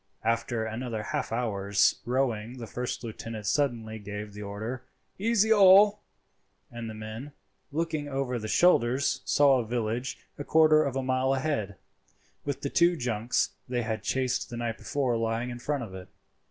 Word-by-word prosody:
After 115 Hz, 0 st, 0 dB
another 110 Hz, -1 st, -4 dB
half -, -, -3 dB
hour's 100 Hz, -4 st, +1 dB
rowing 120 Hz, -2 st, -1 dB
the 120 Hz, -, -6 dB
first 125 Hz, +2 st, -4 dB
lieutenant 110 Hz, -1 st, -6 dB
suddenly 115 Hz, -3 st, 0 dB
gave 105 Hz, 0 st, -7 dB
the 105 Hz, -, -8 dB
order 110 Hz, +5 st, -5 dB, 0.4 s
"Easy 220 Hz, +1 st, +3 dB
all," 200 Hz, +1 st, +7 dB, 0.7 s
and 120 Hz, -1 st, -6 dB
the 110 Hz, -, -7 dB
men, 110 Hz, +6 st, -7 dB, 0.4 s
looking 155 Hz, -1 st, -2 dB
over 135 Hz, -3 st, -2 dB
their 110 Hz, -, -5 dB
shoulders, 135 Hz, -5 st, +3 dB
saw 140 Hz, -2 st, +4 dB
a -, -, -1 dB
village 120 Hz, +2 st, -2 dB, 0.2 s
a -, -, -3 dB
quarter 155 Hz, 0 st, +5 dB
of 135 Hz, -2 st, -2 dB
a 135 Hz, -, -1 dB
mile 130 Hz, +1 st, +1 dB
ahead, 130 Hz, -8 st, -2 dB, 0.7 s
with 140 Hz, -2 st, -3 dB
the 140 Hz, -, -2 dB
two 175 Hz, 0 st, +4 dB
junks 120 Hz, -2 st, 0 dB, 0.2 s
they 120 Hz, -1 st, -1 dB
had 110 Hz, -1 st, -3 dB
chased 130 Hz, +4 st, -1 dB
the 120 Hz, -, -6 dB
night 115 Hz, -1 st, -3 dB
before 130 Hz, -4 st, -1 dB
lying 115 Hz, +2 st, -1 dB
in 120 Hz, -, -7 dB
front 140 Hz, +1 st, -2 dB
of 100 Hz, -5 st, -9 dB
it. 95 Hz, -1 st, -9 dB
120 Hz, 165 wpm, -28 LUFS, 110-140 Hz, 0.7 s, all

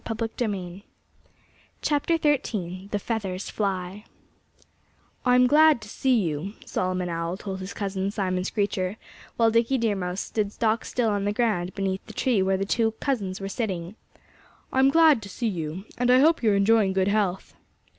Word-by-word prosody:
XIII 210 Hz, -5 st, -3 dB, 1.0 s
THE 235 Hz, -, 0 dB
FEATHERS 200 Hz, -4 st, -3 dB
FLY 195 Hz, 0 st, -3 dB, 1.2 s
"I'm 250 Hz, 0 st, +5 dB
glad 305 Hz, +1 st, +5 dB
to 215 Hz, -, -11 dB
see 255 Hz, +1 st, +2 dB
you," 165 Hz, +4 st, -3 dB
Solomon 185 Hz, -1 st, -2 dB
Owl 170 Hz, +1 st, -3 dB
told 190 Hz, -1 st, -6 dB
his 190 Hz, +1 st, -7 dB
cousin 195 Hz, -1 st, -2 dB
Simon 185 Hz, -3 st, -1 dB
Screecher, 195 Hz, 0 st, -1 dB, 0.4 s
while 230 Hz, -1 st, +4 dB
Dickie 230 Hz, +4 st, +2 dB
Deer 225 Hz, -4 st, +1 dB
Mouse 180 Hz, 0 st, -3 dB
stood 210 Hz, -2 st, -2 dB
stock 225 Hz, +1 st, 0 dB
still 240 Hz, -3 st, 0 dB
on 205 Hz, -1 st, -1 dB
the 205 Hz, -, +1 dB
ground 205 Hz, -5 st, 0 dB
beneath 195 Hz, -1 st, -2 dB
the -, -, -10 dB
tree 240 Hz, -7 st, +1 dB
where 190 Hz, 0 st, +2 dB
the 195 Hz, -, -2 dB
two 225 Hz, +2 st, +1 dB
cousins 210 Hz, -7 st, -2 dB
were 195 Hz, -, -4 dB
sitting. 195 Hz, -3 st, -4 dB, 0.8 s
"I'm 265 Hz, +1 st, +5 dB
glad 315 Hz, -5 st, +5 dB
to 200 Hz, -, -9 dB
see 235 Hz, +4 st, -3 dB
you. 175 Hz, -1 st, -4 dB
And 245 Hz, 0 st, +2 dB
I 250 Hz, -, +7 dB
hope 315 Hz, +5 st, +4 dB
you're 215 Hz, -4 st, +3 dB
enjoying 200 Hz, -1 st, +3 dB
good 190 Hz, 0 st, +1 dB
health." 200 Hz, -3 st, -1 dB
205 Hz, 155 wpm, -25 LUFS, 190-230 Hz, 1.2 s, I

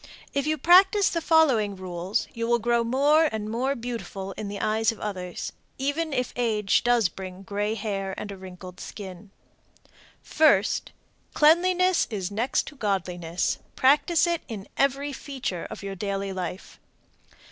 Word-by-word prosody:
If 280 Hz, +1 st, 0 dB
you 310 Hz, -, +2 dB
will 295 Hz, -, -17 dB
practice 380 Hz, +4 st, +6 dB
the 335 Hz, -, -1 dB
following 270 Hz, -12 st, +3 dB
rules 185 Hz, +3 st, -3 dB
you 230 Hz, 0 st, -3 dB
will 240 Hz, 0 st, +3 dB
grow 235 Hz, +1 st, +1 dB
more 285 Hz, +7 st, +4 dB
and 215 Hz, -1 st, -4 dB
more 260 Hz, +4 st, 0 dB
beautiful 230 Hz, -5 st, -5 dB
in 210 Hz, +1 st, -6 dB
the 200 Hz, 0 st, -5 dB
eyes 220 Hz, +2 st, +1 dB
of 225 Hz, -, -11 dB
others, 185 Hz, -4 st, -5 dB, 0.3 s
even 285 Hz, +4 st, -1 dB
if 250 Hz, -3 st, -1 dB
age 215 Hz, -5 st, +1 dB
does 240 Hz, -4 st, +3 dB
bring 185 Hz, +2 st, -9 dB
gray 205 Hz, +2 st, -2 dB
hair 195 Hz, -3 st, -3 dB
and 205 Hz, -, -6 dB
a -, -, -6 dB
wrinkled 185 Hz, -1 st, -11 dB
skin: 195 Hz, -1 st, -9 dB, 0.9 s
First. 285 Hz, -11 st, +3 dB, 0.4 s
Cleanliness 360 Hz, +4 st, +4 dB
is 200 Hz, -4 st, -3 dB
next 225 Hz, +6 st, 0 dB
to 300 Hz, -, -16 dB
godliness. 180 Hz, -, -1 dB, 0.2 s
Practice 300 Hz, +5 st, +4 dB
it 340 Hz, -1 st, 0 dB
in 215 Hz, -4 st, -7 dB
every 275 Hz, +1 st, +1 dB
feature 260 Hz, -, -5 dB
of -, -, -8 dB
your 195 Hz, -1 st, -4 dB
daily 195 Hz, 0 st, -3 dB
life. 185 Hz, 0 st, -6 dB
220 Hz, 155 wpm, -26 LUFS, 195-280 Hz, 0.9 s, practice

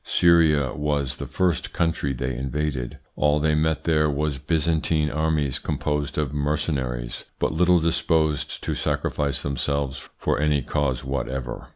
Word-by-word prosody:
Syria 80 Hz, -5 st, +4 dB
was 75 Hz, -2 st, -1 dB
the -, -, -5 dB
first 90 Hz, -4 st, 0 dB
country 80 Hz, -4 st, 0 dB
they 65 Hz, 0 st, -3 dB
invaded. 65 Hz, -1 st, -3 dB, 0.2 s
All 75 Hz, 0 st, +3 dB
they 75 Hz, +1 st, +2 dB
met 80 Hz, +1 st, +1 dB
there 75 Hz, -2 st, +3 dB
was 75 Hz, -1 st, -1 dB
Byzantine 80 Hz, 0 st, +1 dB
armies 75 Hz, -3 st, 0 dB
composed 75 Hz, -1 st, -2 dB
of 75 Hz, -2 st, -1 dB
mercenaries, 70 Hz, -5 st, -2 dB
but -, -, 0 dB
little 90 Hz, +2 st, +4 dB
disposed 80 Hz, -2 st, +1 dB
to -, -, -1 dB
sacrifice 70 Hz, -2 st, -1 dB
themselves 70 Hz, -1 st, -2 dB
for -, -, 0 dB
any 75 Hz, -2 st, +2 dB
cause 70 Hz, -2 st, -1 dB
whatever. 65 Hz, -2 st, -4 dB
75 Hz, 140 wpm, -24 LUFS, 70-80 Hz, 0.2 s, Syria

